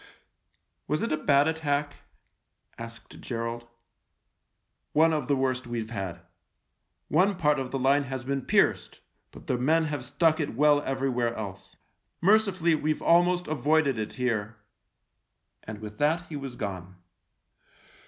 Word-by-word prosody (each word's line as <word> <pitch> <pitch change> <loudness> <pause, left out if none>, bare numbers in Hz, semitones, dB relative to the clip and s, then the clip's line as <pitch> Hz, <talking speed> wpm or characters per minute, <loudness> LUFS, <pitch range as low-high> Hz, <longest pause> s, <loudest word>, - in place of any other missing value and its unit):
" - - -49
Was 150 +1 0
it 230 - -2
a - - +3
bad 145 0 +3
attack? 150 -2 -1 0.4
" - - -42
asked 115 0 -13
Gerald. 115 0 -4 0.6
" - - -52
One 160 0 +5
of 150 -5 -2
the 140 - +2
worst 130 -2 -1
we've 115 -2 -4
had. 95 -5 -5 0.9
One 195 +2 +3
part 150 -5 +2
of 130 -1 -4
the 135 - -2
line 140 +2 +2
has 130 -2 -5
been 135 +1 -2
pierced, - - +1 0.3
but - - -14
the 125 - -1
men 160 +6 +3
have 145 -4 -3
stuck 155 +5 +1
it 145 -7 -2
well 145 +2 +4
everywhere 130 -4 -1
else. 100 -3 -8 0.4
Merci 210 +3 +4
fully 170 -2 +1
we've 155 0 -1
almost 175 +1 +3
avoided 150 -3 +1
it 110 - -4
here." 110 -4 -2 1.1
And 105 -1 -8
with 105 -1 -9
that 160 +4 +2
he 155 - -6
was 135 -3 -6
gone. 95 -4 -6
140 Hz, 155 wpm, -27 LUFS, 120-155 Hz, 1.1 s, One